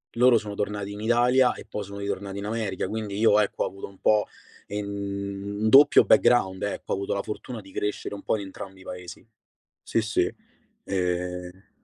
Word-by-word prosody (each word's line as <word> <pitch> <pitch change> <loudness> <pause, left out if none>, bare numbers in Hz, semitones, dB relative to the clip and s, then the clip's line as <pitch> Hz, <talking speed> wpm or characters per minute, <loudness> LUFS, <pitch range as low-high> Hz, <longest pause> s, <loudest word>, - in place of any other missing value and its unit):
loro 125 0 +6
sono 105 -1 -4
tornati 100 0 -3
in 105 - -7
Italia 120 +3 +4
e - - -11
poi 105 - -5
sono 100 +1 -8
ritornati 100 0 -4
in 100 - -5
America, 105 -4 -2
quindi 105 -2 -4
io 105 -1 +5
ecco 105 - 0
ho - - 0
avuto 95 - -8
un 95 -1 -17
po' 105 -1 +3 0.4
in 105 0 -3
un 100 +1 -3
doppio 145 +3 +8
background, 95 -6 +4
ecco, 100 - -4
ho - - +2
avuto 100 0 -2
la 100 - -1
fortuna 110 +1 -6
di 95 0 -15
crescere 105 +1 -3
un 100 - -9
po' - - +1
in 100 - -4
entrambi 95 0 -9
i - - -13
Paesi. 90 +1 -9 0.6
Sì, 115 - 0
sì. 110 0 0 0.5
Ehm 90 0 -3
100 Hz, 195 wpm, -26 LUFS, 95-110 Hz, 0.6 s, doppio